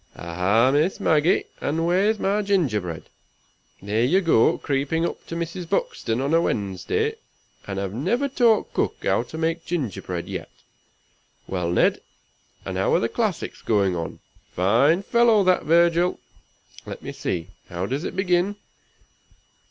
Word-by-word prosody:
Aha, 95 +9 +2
Miss 155 +7 +1
Maggie! 155 +2 +3 0.2
and 160 +3 -1
where's 195 +5 +2
my 200 +1 0
gingerbread? 115 - -1 0.8
There 105 +3 0
you 165 +10 +3
go, 165 -11 +3
creeping 145 +4 -1
up - - -5
to 165 - -5
Mrs. 170 +1 -5
Buxton 115 - -1
on 140 +3 -1
a 165 - +5
Wednesday, 100 - -1 0.5
and 95 -1 -4
have 100 -1 -3
never 200 - 0
taught 240 -5 +2
Cook - - 0
how - - +2
to 160 - -8
make 165 +1 -1
gingerbread 105 - -4
yet. - - -6 1.0
Well, 90 -3 -2
Ned! 85 - +2 0.6
and 95 - -4
how 95 - +2
are - - +4
the 115 - -1
classics 215 -7 -2
going 100 -4 +1
on? 85 -1 -5 0.3
Fine 120 - +3
fellow, 235 -2 +4
that 185 -1 +2
Virgil! 170 +2 +3 0.7
Let - - -8
me - - -5
see, 85 0 -4 0.2
how 90 0 -3
does 135 +9 -3
it - - -5
begin? 190 +1 +1
155 Hz, 145 wpm, -23 LUFS, -, 1.0 s, a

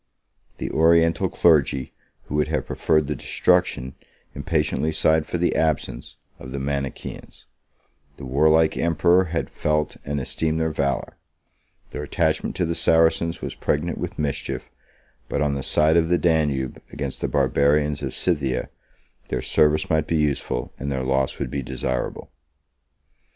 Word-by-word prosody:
The - - -4
Oriental 80 +1 +3
clergy 70 -6 +2 0.3
who - - -9
would 75 -1 +1
have - - -1
preferred 75 -2 +1
the 75 - -2
destruction, 65 -1 +1 0.4
impatiently 75 +1 0
sighed 80 0 +2
for - - -2
the 85 +1 +1
absence, 80 -3 -1 0.2
of 65 - -9
the 70 - -4
Manichaeans: 70 0 -5 0.7
the 70 - -8
warlike 80 +4 +3
emperor 85 +3 +3
had 85 -1 -3
felt 75 0 -1
and 70 0 -2
esteemed 80 +4 -1
their 80 0 0
valor: 70 -4 -2 0.7
their - - -5
attachment 75 - -1
to 90 - 0
the 85 - -1
Saracens 80 +1 +2
was - - -4
pregnant 80 +3 -1
with - - -5
mischief; 75 -2 -3 0.6
but, - - -1
on 75 -1 +1
the 70 - -3
side 80 +4 +3
of 80 -1 +2
the 90 - +4
Danube, 75 -7 0
against 70 -2 -4
the - - 0
Barbarians 70 +2 +2
of 65 -2 -4
Scythia, 70 -8 -1 0.6
their - - -3
service 75 0 +2
might 80 -1 +1
be 80 - +1
useful, 75 -3 -1
and 70 - -3
their 65 -1 -2
loss 65 0 0
would - - -4
be 70 - -2
desirable. 65 0 -4
75 Hz, 150 wpm, -23 LUFS, 70-80 Hz, 0.7 s, the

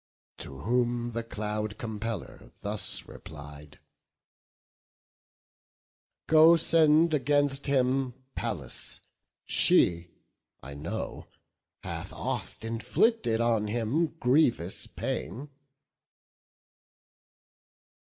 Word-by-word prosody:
To 70 0 -8
whom 120 +2 0
the 115 0 -3
Cloud 105 -1 -4
compeller 110 - -6
thus 105 0 -3
replied: 75 0 -11 2.5
"Go, 160 +1 +7
send 160 0 +4
against 145 -1 +1
him 130 -2 +1 0.2
Pallas; 90 - -3 0.4
she, 85 0 +4 0.6
I 70 - -8
know, 85 +10 -5 0.6
Hath - - -6
oft - - -5
inflicted 115 - +1
on 115 -3 +1
him 120 +9 0
grievous 120 - +2
pain.". 115 - -5
115 Hz, 75 wpm, -28 LUFS, 105-135 Hz, 2.5 s, Go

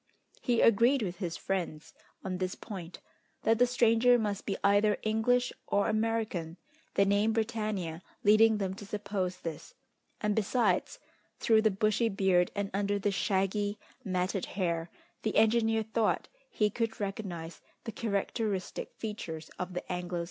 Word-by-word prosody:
He 240 -2 +2
agreed 235 +4 +5
with 180 -3 -4
his 175 -4 -3
friends 175 -5 -3 0.3
on 185 -1 -3
this 185 0 -2
point, 185 -5 -8 0.4
that 225 +1 +3
the 245 - +6
stranger 240 0 +4
must 205 -3 -2
be 195 - -1
either 205 +1 +4
English 245 +3 +2
or 200 0 +2
American, 215 -7 -1 0.4
the 200 - +4
name 205 +3 +2
Britannia 215 -7 -2 0.2
leading 215 +1 +6
them 195 -2 -2
to 205 +1 -9
suppose 200 -3 -2
this, 160 -3 -7 0.4
and, 210 -1 0
besides, 215 -3 +1 0.4
through 220 -1 +4
the 220 - +4
bushy 215 +3 +1
beard, 190 -3 +2
and 200 -1 -2
under 200 +1 0
the 200 +1 0
shaggy, 205 +1 0 0.3
matted 185 -1 -1
hair, 170 -3 0 0.3
the 215 - -2
engineer 225 0 +3
thought 220 0 0 0.2
he 210 - +1
could 225 0 -2
recognise 195 -5 -5 0.2
the 225 - -5
characteristic 205 -2 -2
features 165 -8 -6
of 180 0 -4
the 180 - -2
Anglo 180 0 -3
Saxon. - - -1
205 Hz, 150 wpm, -30 LUFS, 185-220 Hz, 0.4 s, the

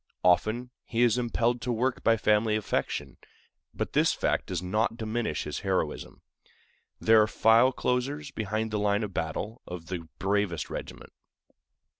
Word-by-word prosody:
Often 110 +8 +2
he 120 +1 0
is 120 0 +3
impelled 120 0 0
to 125 - -2
work 125 +3 -1
by 115 0 +4
family 105 +1 +2
affection, 70 - -2 0.5
but - - -4
this - - +3
fact - - 0
does - - -2
not 110 +5 0
diminish 110 -7 -2
his - - -4
heroism. - - -2 0.8
There 110 -1 +6
are 105 - +3
file 115 +4 +5
closers 135 +4 -2
behind 110 +1 -2
the 105 - -1
line 105 +1 +1
of 100 -2 -5
battle 90 +9 -3
of 90 -1 -8
the 85 -3 -5
bravest 100 -3 -1
regiment. - - -7
110 Hz, 150 wpm, -28 LUFS, 100-120 Hz, 0.8 s, There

